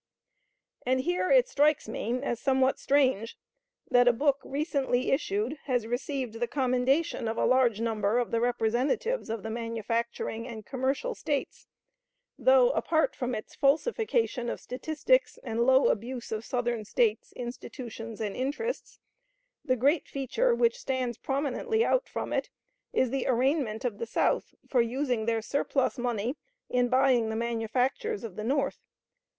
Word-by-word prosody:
And 260 +1 +1
here 355 +5 0
it - - +5
strikes 295 -2 +2
me 230 +2 -2
as 240 -4 -2
somewhat 265 0 +2
strange 260 -6 +2 0.5
that 245 0 +5
a - - +8
book 275 +3 +1
recently 275 -4 0
issued 255 0 0
has 245 -5 0
received 245 -1 -3
the 240 - 0
commendation 260 +1 +1
of 225 - -2
a - - +2
large 250 -4 +3
number 220 -1 0
of 245 -1 0
the 230 - +1
representatives 245 - 0
of 225 -2 -3
the 220 - -4
manufacturing 230 0 -3
and 220 -4 -8
commercial 270 - -1
States, 290 -9 -3 0.7
though, - - +5
apart 320 -8 +1
from 250 -1 -2
its 215 - -7
falsification 325 - +1
of - - -4
statistics 315 - 0
and 235 0 0
low 265 +1 +5
abuse 240 +3 -3
of 220 0 -3
Southern 240 -2 -1
States, 215 +1 0
institutions, 235 -2 -7
and 210 -3 -3
interests, 295 - -3 0.7
the 255 -4 +2
great 280 +6 +2
feature 460 - 0
which 475 +1 +2
stands 255 - -2
prominently 295 - 0
out - - +1
from - - -4
it - - -1 0.4
is 255 -2 +1
the 270 -1 -1
arraignment 255 -2 +1
of 215 -5 -2
the 230 - -3
South - - 0
for 250 - +3
using 245 -1 -1
their 225 -1 +1
surplus 275 0 0
money 240 +1 -1 0.4
in 245 -1 +2
buying 255 -3 +3
the 220 - -2
manufactures 245 - -1
of 215 -6 -7
the 215 - -5
North. 275 +3 0
255 Hz, 150 wpm, -29 LUFS, 230-280 Hz, 0.7 s, a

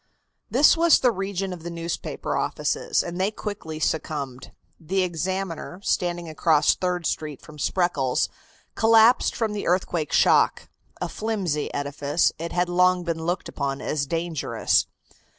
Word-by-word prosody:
This 280 +7 +5
was 335 -1 +5
the 250 - +4
region 195 -2 -3
of 175 - -9
the 170 - -6
newspaper 170 0 -4
offices, - - 0
and 175 +1 -4
they 195 - +2
quickly 205 -7 -6
succumbed. 140 -5 -3 0.3
The 185 +4 0
Examiner, 180 0 -3
standing 175 -2 -1
across 155 -1 +3
Third 180 -2 -2
Street 150 -3 -3
from 150 -1 -14
Spreckles, 145 -8 +1 0.5
collapsed 225 +2 +5
from 220 -2 -1
the 205 - -4
earthquake 175 -3 0
shock. - - +3 0.3
A - - -2
flimsy 195 -9 -2
edifice, 145 +2 0
it 170 +1 -4
had 175 0 +1
long 180 0 +3
been 165 -1 -3
looked 175 +1 -1
upon 140 -1 -3
as 140 -2 -2
dangerous. 165 0 0
175 Hz, 140 wpm, -24 LUFS, 155-190 Hz, 0.5 s, This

